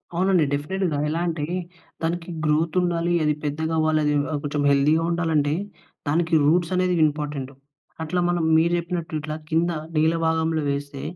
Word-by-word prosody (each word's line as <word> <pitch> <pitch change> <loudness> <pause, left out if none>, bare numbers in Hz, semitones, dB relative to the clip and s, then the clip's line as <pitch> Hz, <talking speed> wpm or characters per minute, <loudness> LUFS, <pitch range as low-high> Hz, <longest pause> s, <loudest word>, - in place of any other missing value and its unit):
అవునండి. 185 -2 +3
డెఫినిట్‌గా. 165 +2 -1
ఎలా 165 - -1
అంటే, 160 -3 -2 0.6
దానికి 170 +1 -2 0.2
గ్రోత్ 155 +2 +1
ఉండాలి. 175 0 0
అది 150 0 +2
పెద్దగా 160 +2 -2
అవ్వాలి. 155 0 +2
అది 150 - +2
ఆహ్, 145 - -1
ఆ - - +1
కొంచెం 145 0 -1
హెల్తీగా 150 +4 +3
ఉండాలి 170 -1 0
అంటే, 145 0 +1 0.5
దానికి 165 +3 0
రూట్స్ 170 +3 +2
అనేది 180 0 +2
ఇంపార్టెంటు. 145 -3 -4 0.5
అట్లా 170 +3 -1
మనం 175 -2 0
మీరు 170 +2 +3
చెప్పినట్టు 170 -1 -4
ఇట్లా 155 0 -5
కింద 165 +2 +2 0.3
నేల 160 +2 +3
భాగంలో 160 -1 +1
వేస్తే, 140 0 -5
160 Hz, 160 wpm, -23 LUFS, 150-170 Hz, 0.6 s, అవునండి